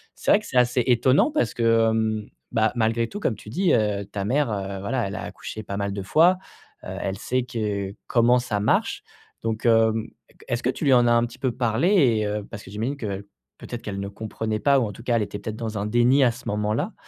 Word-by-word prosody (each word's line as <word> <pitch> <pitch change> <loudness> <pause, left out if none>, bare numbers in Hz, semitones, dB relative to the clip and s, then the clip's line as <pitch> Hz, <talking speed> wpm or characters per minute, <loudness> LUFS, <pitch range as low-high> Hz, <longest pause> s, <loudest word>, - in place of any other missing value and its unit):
C'est - - 0
vrai 205 - +6
que 210 - -13
c'est - - -2
assez 125 0 +3
étonnant 130 - +4
parce 295 - 0
que, 115 -1 +3
hem, 110 -1 -1 0.2
bah, 110 0 +2
malgré 115 0 +1
tout, 205 - -7
comme 125 - 0
tu 105 - -12
dis, 180 - +1
heu, 105 -2 +1
ta 100 0 -5
mère, 135 +3 +1
heu, 100 -1 -4
voilà, 120 +4 -1
elle 95 - -6
a - - -5
accouché 110 - -7
pas 100 -1 -5
mal 100 0 -2
de 100 - -4
fois, 170 - +4 0.5
heu, - - -8
elle 95 0 -3
sait 130 0 -1
que 105 -5 -3
comment 120 +1 +4
ça 110 -4 -2
marche. 100 - +1 0.4
Donc, 115 0 -3
hem, 115 -1 +3 0.2
e - - -26 0.2
est-ce 120 0 -1
que 125 - +1
tu - - -7
lui 135 - +5
en 120 -1 +5
a - - +4
un 120 0 +4
petit 120 - -13
peu 130 - 0
parlé 120 +6 +1
et 125 - +3
heu, 105 0 -2
parce 105 - -8
que 95 - -12
j'imagine 115 +7 -3
qu'el 100 -6 -4 0.4
peut-être 120 -1 -7
qu'elle 100 -2 -4
ne 100 - -3
comprenait 110 +1 -4
pas 140 +3 +4
ou 125 - +1
en - - -5
tout 115 - -12
cas, 120 -1 +1
elle 110 - +1
était 105 0 -6
peut-être 110 +1 -5
dans 110 -2 -4
un 100 - -2
déni 120 +5 +4
à 125 - +5
ce 125 +2 -11
moment-là? 105 +1 -1
115 Hz, 250 wpm, -24 LUFS, 105-125 Hz, 0.5 s, vrai